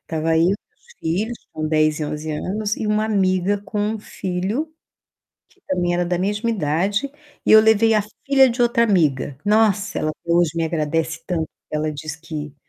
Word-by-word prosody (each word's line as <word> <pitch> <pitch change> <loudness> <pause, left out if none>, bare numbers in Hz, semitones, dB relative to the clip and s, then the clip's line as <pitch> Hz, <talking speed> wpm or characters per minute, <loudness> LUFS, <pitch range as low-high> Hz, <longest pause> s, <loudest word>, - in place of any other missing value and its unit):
Estava 160 0 -1
eu 165 - +4
e - - +4 0.2
meus - - -24
filhos, 210 +9 -3
com 155 0 -3
10 155 0 +2
e - - -1
11 150 +1 -4
anos, 205 +7 -2
e 220 - -3
uma 210 +1 +1
amiga 195 -2 +1
com 205 +1 -5
um 215 +1 -1
filho 200 - -3 0.8
que 385 - -29
também 175 -2 0
era 175 0 0
da 175 0 -1
mesma 205 +5 -1
idade 195 - 0 0.3
e - - +4
eu 220 - +10
levei 220 +1 +4
a 210 - +3 0.2
filha 270 -2 +5
de 240 +1 0
outra 235 -1 +3
amiga. 150 - +1
Nossa, 210 -1 +2
ela 155 - 0
até 170 +2 -4
hoje 170 -1 +3
me 165 - +1
agradece 160 0 -1
tanto, 165 -4 -2 0.2
ela 155 0 -1
diz 150 +1 -6
que 150 -2 -7
180 Hz, 190 wpm, -21 LUFS, 160-215 Hz, 0.8 s, eu